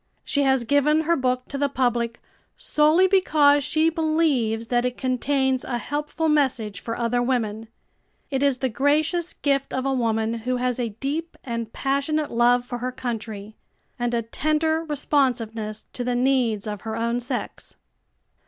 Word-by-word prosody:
She 285 - 0
has 265 -3 +3
given 285 +5 +3
her 335 +2 +2
book 255 -3 -1
to 280 - -4
the 285 0 +1
public 240 -3 0 0.4
solely 310 +5 +3
because 305 -7 +4
she 315 +3 +2
believes 305 -9 +1
that 240 -1 +2
it 250 0 -2
contains 265 0 0
a 240 - -2
helpful 295 +6 -2
message 260 -10 +1
for 230 - -5
other 240 +1 0
women, 225 -3 -1 0.6
It 270 -1 0
is 280 -2 +3
the 260 - 0
gracious 310 +7 +1
gift 275 -1 -1
of 260 0 -2
a 270 - +1
woman 225 -2 0
who 250 +2 -1
has 250 0 -1
a 235 -2 -1
deep 305 +6 -3
and 230 -3 -4
passionate 280 +4 -1
love 245 +1 +3
for 245 -1 -5
her 250 +2 -2
country, 220 -4 -5 0.4
and 240 0 0
a 230 - 0
tender 310 +6 0
responsiveness 240 -8 -1
to 245 - -4
the 245 0 -1
needs 245 -5 +1
of 210 -3 -5
her 220 0 -4
own 235 +1 0
sex. 245 - -5
255 Hz, 160 wpm, -24 LUFS, 235-290 Hz, 0.6 s, because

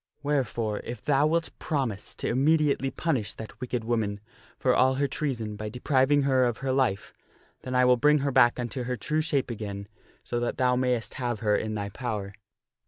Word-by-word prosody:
Wherefore, 120 -7 -1
if 120 -2 -7
thou 145 +1 +3
wilt 165 +1 0
promise 125 -9 -2
to - - -3
immediately 140 +1 +2
punish 135 -8 -2
that 110 +3 -10
wicked 125 -2 -2
woman 110 -3 -1 0.4
for 125 - +2
all 130 +1 +4
her 140 +1 +1
treason 120 -7 -3
by 105 +1 -5
depriving 135 +4 +2
her 130 -2 +3
of 120 -2 -1
her 130 - +1
life, 130 -7 0 0.5
then 130 - -5
will 125 0 +5
I - - -9
bring 150 +4 +5
her 140 - +1
back 120 -1 +4
unto 120 +1 -3
her 125 0 -2
true 155 +5 0
shape 145 -5 0
again 100 -3 -6 0.4
so 120 - -2
that 120 - -2
thou 125 -1 +3
mayst 125 -3 0
have 120 -4 -2
her 105 -1 +2
in 110 0 -2
thy 100 -1 -3
power." 105 -3 -4
125 Hz, 190 wpm, -27 LUFS, 110-135 Hz, 0.5 s, will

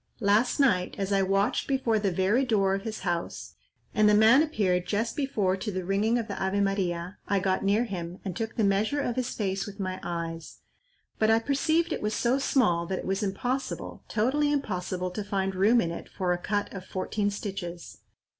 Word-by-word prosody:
"Last 215 +4 +2
night, 185 -10 +2
as 195 0 -1
I 195 - +3
watched 195 +1 +1
before 260 -5 +1
the 200 -2 0
very 190 +8 +2
door 200 -6 +2
of 195 - -1
his 220 +1 -5
house, 175 -2 -3 0.4
and 215 0 +4
the 210 - +5
man 220 +6 +7
appeared 185 - 0
just 225 +3 -1
before 215 -10 0
to 210 +3 -4
the 185 -2 -4
ringing 205 +5 +2
of 230 -2 -2
the 200 - -4
Ave 190 +1 0
Maria, 190 -2 -1
I 200 0 +2
got 190 0 0
near 205 +4 +3
him, 180 -5 -5
and 185 -3 -3
took 225 +2 -4
the 225 - +1
measure 205 +8 +2
of 245 -4 -1
his 255 -1 -1
face 195 -2 -2
with 205 0 -9
my 185 -1 -3
eyes; 165 -1 -5 0.6
but 220 - +3
I 225 - +6
perceived 315 +7 +1
it - - -4
was 210 0 -1
so 250 +3 +1
small 180 -12 +2
that 190 - -2
it - - -5
was 195 +2 -1
impossible, 245 +7 -3
totally 280 +7 +1
impossible, 185 -9 -2
to 210 +3 -4
find 195 -2 -1
room 205 +6 +4
in 170 -6 0
it 170 - -7
for 180 -2 -1
a - - -1
cut 205 +2 -2
of 190 -2 -6
fourteen 200 +2 -2
stitches. 195 -4 -6
200 Hz, 205 wpm, -28 LUFS, 185-225 Hz, 0.6 s, man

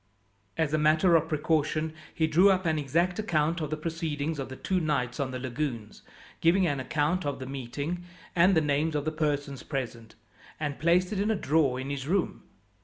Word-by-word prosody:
As 160 -2 0
a 155 - +3
matter 155 +3 +4
of 160 0 +2
precaution 155 0 0 0.2
he 160 - +1
drew 175 +5 +5
up 190 -1 +2
an 160 -2 +1
exact 170 +7 0
account 165 -4 +1
of 155 - -2
the 155 - -2
proceedings 160 -2 -3
of 135 - -4
the 130 - -7
two 185 +7 -1
nights 145 -7 -1
on 135 -2 0
the 130 - -4
lagoons, 125 -4 -4 0.4
giving 180 +3 +4
an 145 -5 0
account 155 +6 0
of 145 -1 -2
the 130 - -6
meeting, 140 +6 -4 0.3
and 180 +2 +5
the - - +5
names 150 +2 0
of 145 0 -1
the 155 - 0
persons 145 -3 -2
present, 115 -5 -5 0.4
and 145 -2 -3
placed 180 +5 +3
it 200 - -2
in 205 +2 +1
a 220 - +2
drawer 145 -7 +2
in 135 +2 -4
his 140 -1 -4
room. 185 +2 0
155 Hz, 200 wpm, -28 LUFS, 140-170 Hz, 0.4 s, drew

